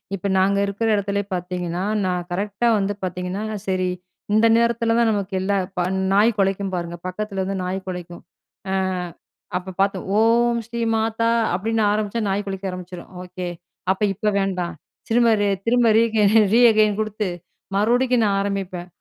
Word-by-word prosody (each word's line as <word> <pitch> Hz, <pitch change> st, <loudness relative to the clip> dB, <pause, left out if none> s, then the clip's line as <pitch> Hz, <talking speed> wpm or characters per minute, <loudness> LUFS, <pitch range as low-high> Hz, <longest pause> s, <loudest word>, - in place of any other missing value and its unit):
இப்ப 200 Hz, +1 st, -4 dB
நாங்க 200 Hz, +1 st, +3 dB
இருக்கிற 205 Hz, +3 st, -2 dB
இடத்துலயே 200 Hz, 0 st, -1 dB
பார்த்திங்கன்னா, 180 Hz, 0 st, -3 dB, 0.2 s
நான் 180 Hz, -1 st, -1 dB
கரெக்ட்டா 200 Hz, +5 st, -1 dB
வந்து 200 Hz, 0 st, 0 dB
பார்த்திங்கன்னா, 180 Hz, +3 st, -3 dB, 0.2 s
சரி 185 Hz, -1 st, 0 dB, 0.4 s
இந்த 220 Hz, +1 st, +5 dB
நேரத்தில 235 Hz, -1 st, +2 dB
தான் 230 Hz, -1 st, +4 dB
நமக்கு 200 Hz, -2 st, -2 dB
எல்லா 200 Hz, +1 st, 0 dB, 0.6 s
நாய் 215 Hz, +4 st, +5 dB
கொலைக்கும் 195 Hz, 0 st, 0 dB
பாருங்க 170 Hz, 0 st, -4 dB
பக்கத்தில 195 Hz, +1 st, -3 dB
வந்து 195 Hz, +1 st, -3 dB
நாய் 185 Hz, +1 st, -2 dB
கொலைக்கும். 175 Hz, -1 st, -7 dB, 0.5 s
ஆ, -, -, 0 dB, 0.8 s
அப்ப 185 Hz, 0 st, -7 dB
பார்த்தோம் 195 Hz, -1 st, 0 dB
"ஓம் 235 Hz, +1 st, +3 dB
ஸ்ரீ 235 Hz, 0 st, -5 dB
மாதா" 225 Hz, +1 st, 0 dB, 0.2 s
அப்படின்னு 220 Hz, +4 st, 0 dB
ஆரம்பிச்சா 215 Hz, +2 st, -1 dB
நாய் 200 Hz, +1 st, 0 dB
கொலைக்க 195 Hz, 0 st, -4 dB
ஆரம்பிச்சுரும். 180 Hz, -1 st, -8 dB
"ஓகே 180 Hz, 0 st, -7 dB, 0.5 s
அப்ப 190 Hz, -, -3 dB
இப்ப 210 Hz, +3 st, 0 dB
வேண்டா" 190 Hz, -2 st, -1 dB, 0.4 s
திரும்ப, 235 Hz, 0 st, +4 dB, 0.4 s
திரும்ப 240 Hz, 0 st, +3 dB
ரீக 225 Hz, -2 st, +3 dB, 0.3 s
ரீகெயின் 215 Hz, -3 st, +5 dB
குடுத்து 215 Hz, -2 st, -2 dB, 0.5 s
மறுபடிக்கும் 245 Hz, +3 st, +2 dB
நான் 200 Hz, -1 st, +1 dB
ஆரம்பிப்பேன். 190 Hz, -3 st, -3 dB
200 Hz, 140 wpm, -22 LUFS, 185-225 Hz, 0.8 s, இந்த